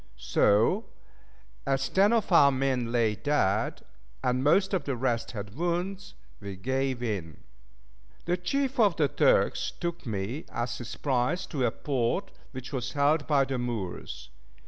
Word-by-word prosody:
So, 105 - +2 0.8
as 135 0 +1
ten 200 +3 +4
of 230 -4 +1
our 140 -5 +7
men 130 -3 0
lay 115 -3 +2
dead, 110 -5 0 0.4
and 125 +1 +1
most 190 +7 +3
of 185 - 0
the 140 - -1
rest 120 -2 -1
had 100 -2 -6
wounds, 175 - -3 0.2
we 100 -1 -7
gave 130 +5 -1
in. 95 -9 -3 0.9
The 175 - +1
chief 265 +9 -1
of 205 -6 +5
the 150 -3 +3
Turks - - +2
took 170 -4 -4
me 110 +7 -3
as 120 0 -3
his 120 -2 -6
prize 140 +7 0
to 135 -8 -1
a - - +3
port 135 - -1 0.2
which 130 +1 -8
was 125 -4 -3
held 145 +1 +2
by 140 -3 +3
the 130 -1 -3
Moors. 90 - -5
135 Hz, 150 wpm, -28 LUFS, 115-170 Hz, 0.9 s, our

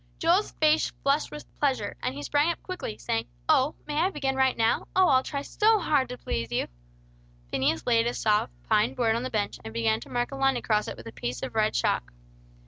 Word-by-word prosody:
Joel's 350 +6 +2
face 310 0 +3
flushed 280 +2 +2
with 300 - -9
pleasure, 260 -8 0
and 125 - -2
he 145 - -6
sprang 290 - +2
up 335 - -8
quickly, 370 - -5
saying, 115 0 -2 0.6
"May 295 0 -4
I 355 +4 +3
begin 275 -6 -2
right 265 -1 +2
now? 225 0 +1
Oh, 375 -1 +5
I'll 260 -1 +5
try 280 +1 -4
so 435 +7 +3
hard 295 -9 +1
to 250 - -6
please 115 - -3
you!" 120 - 0 0.9
Phineas 130 -5 0
laid 230 -1 +3
a 240 - -2
soft 210 - +1 0.2
pine 130 - +2
board 225 - +2
on 230 - -1
the 255 - -3
bench, 210 -3 -2
and 110 - -7
began 110 -1 +1
to - - -12
mark 245 +1 -1
a - - -5
line 270 -1 +2
across 215 -3 0
it - - -6
with - - -11
a - - -7
piece 120 +2 -5
of 130 -3 -4
red - - +1
chalk. - - 0
245 Hz, 220 wpm, -27 LUFS, -, 0.9 s, Oh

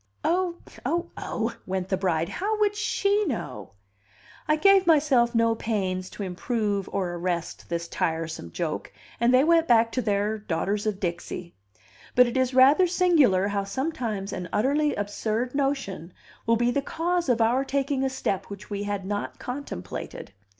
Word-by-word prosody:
"Oh, 350 +1 +1 0.3
oh, 340 +1 -1
oh!" 230 +1 -3
went 190 0 -2
the 190 - +2
bride. 170 -4 0
"How 425 - -2
would 415 -1 +2
she 415 -1 +1
know?" 130 - -5 0.7
I 305 - +4
gave 390 +3 +5
myself 275 -7 +4
no 230 0 +4
pains 190 -5 -2
to 205 - -6
improve 200 +1 -2
or 185 -3 -1
arrest 175 -1 -3
this 170 0 -2
tiresome 160 - -3
joke, - - -3 0.3
and 235 +1 +4
they 255 +1 +6
went 330 +1 +4
back 230 -1 +4
to 255 - -1
their 210 0 0
Daughters 205 +3 -1
of 205 -2 -1
Dixie; 175 -1 -4 0.6
but 250 - +7
it 240 - -3
is 260 -1 +2
rather 280 +8 +6
singular 305 - +3
how 200 -1 -1
sometimes 220 -3 -3
an 180 -1 -5
utterly 285 +5 +2
absurd 215 +4 -2
notion 270 - -2 0.3
will 230 0 +4
be 240 +1 +2
the 280 - 0
cause 340 +2 -1
of 240 -2 +3
our 235 +4 +3
taking 275 0 -1
a 265 - +1
step 200 -7 -2
which 200 +1 -10
we 200 0 -2
had 205 -2 -3
not 205 +1 -3
contemplated. 250 - -6
230 Hz, 165 wpm, -26 LUFS, 195-280 Hz, 0.7 s, but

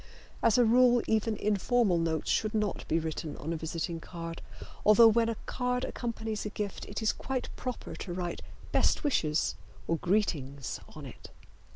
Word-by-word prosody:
As 225 - +4
a 245 - +6
rule 245 +1 +5
even 220 0 +1
informal 210 -2 +2
notes 160 -1 0
should 215 0 +1
not 210 -3 -1
be 160 - +2
written 160 -1 -4
on 160 +3 -3
a - - -2
visiting 165 +1 -3
card, 165 0 -7 0.4
although 220 +2 +8
when 230 +1 +3
a 230 - -1
card 250 0 -1
accompanies 225 -3 -4
a 210 - -3
gift 205 -1 -5
it 210 +2 -4
is 215 - +3
quite 265 -1 -4
proper 250 -1 -5
to 185 - -6
write 175 -1 -3 0.3
"Best - - +2
wishes" 160 - +1 0.3
or 165 - +1
"Greetings" 150 - -1 0.2
on - - -8
it. - - -11
210 Hz, 170 wpm, -30 LUFS, 165-230 Hz, 0.4 s, although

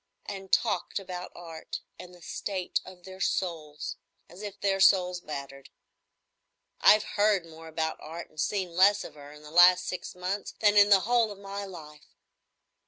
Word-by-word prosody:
—and 195 -2 -7
talked 235 - +1
about 180 -2 -6
Art 165 -2 -8 0.2
and 180 0 -10
the 175 -1 -16
state 185 0 -3
of 185 -1 -13
their 190 0 -11
souls. 155 -5 -2 0.3
As 175 +4 -12
if 205 -1 -7
their 195 -1 +1
souls 180 -2 +4
mattered. 140 -3 -8 1.1
I've 215 0 +6
heard 205 -4 +1
more 165 0 -12
about 160 0 -3
Art 165 +2 -8
and 155 - -16
seen 185 -4 -2
less 200 +3 +5
of - - -9
her 145 -1 -12
in 150 0 -14
the 150 - -12
last 180 +2 +7
six 180 - -5
months 185 +2 -4
than 210 -1 +4
in 205 0 +7
the 195 -2 +6
whole 235 +1 +2
of 200 - -9
my 200 0 -6
life. 155 -5 -12
180 Hz, 170 wpm, -28 LUFS, 165-200 Hz, 1.1 s, last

